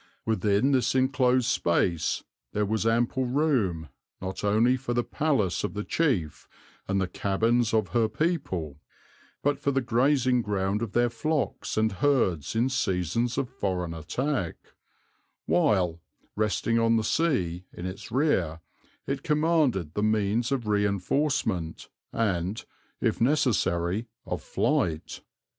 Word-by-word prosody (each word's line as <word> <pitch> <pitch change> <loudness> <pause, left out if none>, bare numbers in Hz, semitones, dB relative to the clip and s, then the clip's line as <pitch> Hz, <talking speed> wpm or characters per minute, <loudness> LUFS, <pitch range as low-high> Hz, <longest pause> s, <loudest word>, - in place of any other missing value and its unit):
Within 110 +3 +2
this 130 -1 +2
enclosed 130 -1 +3
space 85 -6 +1 0.3
there 105 0 +1
was 110 +1 0
ample 120 +3 +1
room, 120 - 0 0.3
not 95 +1 -5
only 110 +5 +3
for 125 -2 -3
the 120 - +2
palace 135 - 0
of 105 - -3
the 105 - -2
chief 105 - -1 0.4
and 100 0 +1
the 95 - 0
cabins 115 +5 +1
of 110 -4 +1
her 110 +4 +2
people, 95 - -2 0.6
but 145 0 +1
for - - 0
the 135 -1 +2
grazing 125 +1 +2
ground 100 -1 -1
of 115 -4 -4
their 120 0 +2
flocks 150 +3 -2
and 110 0 +2
herds 95 - +1
in 115 +3 +3
seasons 115 - 0
of 135 - 0
foreign 95 -8 -3
attack; 95 - -2 0.9
while, 90 0 +2 0.3
resting 110 +2 +1
on 115 0 +3
the 110 - +1
sea 95 - 0
in 85 - -8
its 95 +3 -7
rear, 95 - +1 0.5
it 135 0 -2
commanded 150 - +1
the 105 - -1
means 110 +3 +1
of 125 -5 -1
reinforcement 105 - 0 0.2
and, 95 -2 -1 0.4
if - - 0
necessary, 110 - +1 0.2
of - - -3
flight. 80 -1 -1
110 Hz, 130 wpm, -27 LUFS, 95-130 Hz, 0.9 s, enclosed